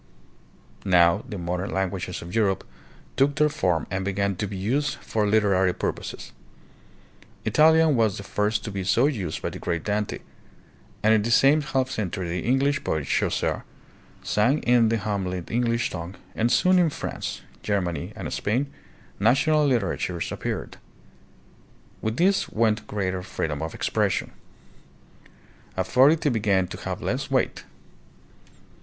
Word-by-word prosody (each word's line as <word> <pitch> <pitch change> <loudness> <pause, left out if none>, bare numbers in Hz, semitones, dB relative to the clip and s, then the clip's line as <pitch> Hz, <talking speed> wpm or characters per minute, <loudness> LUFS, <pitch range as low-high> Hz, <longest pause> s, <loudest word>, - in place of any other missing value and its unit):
Now 90 +1 +4
the 105 - -5
modern 90 +2 -3
languages 95 -2 -3
of 85 - -9
Europe 105 -4 +1 0.5
took 140 +1 +2
their 150 0 +3
form 90 - 0
and 95 +1 -1
began 100 0 0
to 105 - -2
be 100 0 -6
used 135 +10 0
for 105 -2 -1
literary 100 -4 +3
purposes. - - -4 1.1
Italian 160 -1 +5
was 110 -4 +2
the 100 - -7
first 105 +2 -1
to 110 - -5
be 100 -1 -3
so 115 +7 +3
used 105 - -2
by - - -2
the - - -8
great 85 -2 -2
Dante, 105 0 -1 0.9
and 110 +1 +5
in 110 - +4
the 110 - -2
same 140 +6 +5
half 135 -2 -1
century 95 -3 -3
the 90 +2 -2
English 135 +3 +2
poet 80 -3 -1
Chaucer - - 0 0.6
sang 125 +8 +2
in 120 -2 +4
the 115 - +1
homely 95 -4 -2
English 115 0 0
tongue, 90 +1 -6 0.2
and 115 +2 +1
soon 185 +5 +4
in 170 -2 +4
France, - - -5 0.2
Germany, 90 -7 -2
and - - -5
Spain 130 +7 -1 0.5
national 145 +8 +3
literatures 95 -8 -1
appeared. - - -4 1.2
With 110 +2 -2
this 190 +3 +2
went 110 -1 +1
greater 95 -3 -2
free 90 -3 -3
dom 75 -1 -4
of 80 0 -4
expression. - - 0 1.5
Authority 130 - +4
began 100 -5 +2
to - - -7
have - - -4
less - - -2
weight. - - 0
105 Hz, 145 wpm, -25 LUFS, 95-130 Hz, 1.5 s, Italian